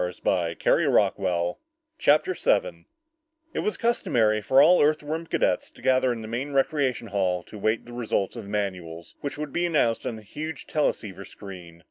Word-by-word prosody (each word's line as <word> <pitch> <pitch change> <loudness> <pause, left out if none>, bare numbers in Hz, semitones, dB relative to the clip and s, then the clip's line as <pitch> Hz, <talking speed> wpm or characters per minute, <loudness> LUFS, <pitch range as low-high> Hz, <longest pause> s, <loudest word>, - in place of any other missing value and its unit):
CHAPTER 155 +5 +3
7 - - 0 0.7
It - - -2
was 210 - -1
customary 115 - +1
for 130 +6 +4
all 165 +6 +7
Earthworm 155 +2 0
cadets 90 - 0
to - - -18
gather 130 -1 +3
in 115 -2 -4
the - - -7
main 130 +6 -4
recreation 135 -4 0
hall 95 -3 0
to 105 - -11
wait 110 +3 +1
for - - -24
the 120 - -11
results 115 -5 -1
of - - -5
the - - -10
manuals 90 -5 -4
which 145 - -4
would 150 -2 -5
be 175 0 +1
announced 130 -9 +1
on 115 - -3
the 110 - -11
huge 155 +9 -6
teleceiver 105 - -2
screen. 90 -5 -11
120 Hz, 165 wpm, -26 LUFS, 100-150 Hz, 0.7 s, all